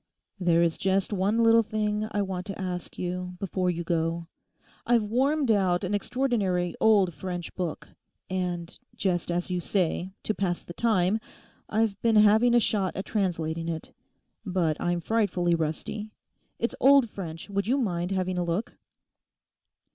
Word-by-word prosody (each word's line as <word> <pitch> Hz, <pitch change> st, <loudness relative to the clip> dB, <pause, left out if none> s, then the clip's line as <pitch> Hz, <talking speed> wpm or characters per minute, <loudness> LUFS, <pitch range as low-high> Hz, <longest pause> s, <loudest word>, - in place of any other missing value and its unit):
'There 170 Hz, -2 st, +3 dB
is 165 Hz, -1 st, 0 dB
just 190 Hz, +2 st, +1 dB
one 205 Hz, +4 st, +2 dB
little 230 Hz, 0 st, +6 dB
thing 215 Hz, -1 st, -1 dB
I 205 Hz, -, 0 dB
want 185 Hz, -1 st, -4 dB
to 195 Hz, -, -6 dB
ask 180 Hz, -2 st, -4 dB
you 180 Hz, 0 st, -4 dB
before 185 Hz, -1 st, -1 dB
you 170 Hz, -1 st, -2 dB
go. 165 Hz, 0 st, -1 dB, 0.6 s
I've 235 Hz, -2 st, +3 dB
wormed 265 Hz, +5 st, +1 dB
out 190 Hz, -3 st, +2 dB
an 190 Hz, +2 st, -2 dB
extraordinary 205 Hz, -7 st, 0 dB
old 200 Hz, -5 st, +4 dB
French 175 Hz, +2 st, -5 dB
book; 175 Hz, -4 st, -4 dB, 0.4 s
and—just 180 Hz, 0 st, -3 dB
as 175 Hz, +1 st, -1 dB
you 180 Hz, -, 0 dB
say—to 185 Hz, +3 st, -1 dB
pass 180 Hz, -4 st, -2 dB
the 175 Hz, -, -9 dB
time, 210 Hz, -1 st, +2 dB, 0.5 s
I've 215 Hz, -2 st, 0 dB
been 230 Hz, -1 st, +3 dB
having 215 Hz, +3 st, +6 dB
a -, -, +7 dB
shot 200 Hz, -4 st, 0 dB
at 195 Hz, -, -4 dB
translating 165 Hz, -5 st, -1 dB
it. 160 Hz, -1 st, -5 dB, 0.5 s
But 180 Hz, -6 st, 0 dB
I'm 175 Hz, 0 st, 0 dB
frightfully 190 Hz, -5 st, +1 dB
rusty; 165 Hz, +7 st, -2 dB, 0.5 s
it's 235 Hz, -, -1 dB
old 275 Hz, -2 st, +6 dB
French; 165 Hz, -6 st, -7 dB
would 200 Hz, +1 st, -1 dB
you 260 Hz, +4 st, +2 dB
mind 180 Hz, -8 st, -1 dB
having 185 Hz, -1 st, -1 dB
a -, -, +1 dB
look? 170 Hz, +6 st, -3 dB
190 Hz, 150 wpm, -27 LUFS, 175-215 Hz, 0.6 s, a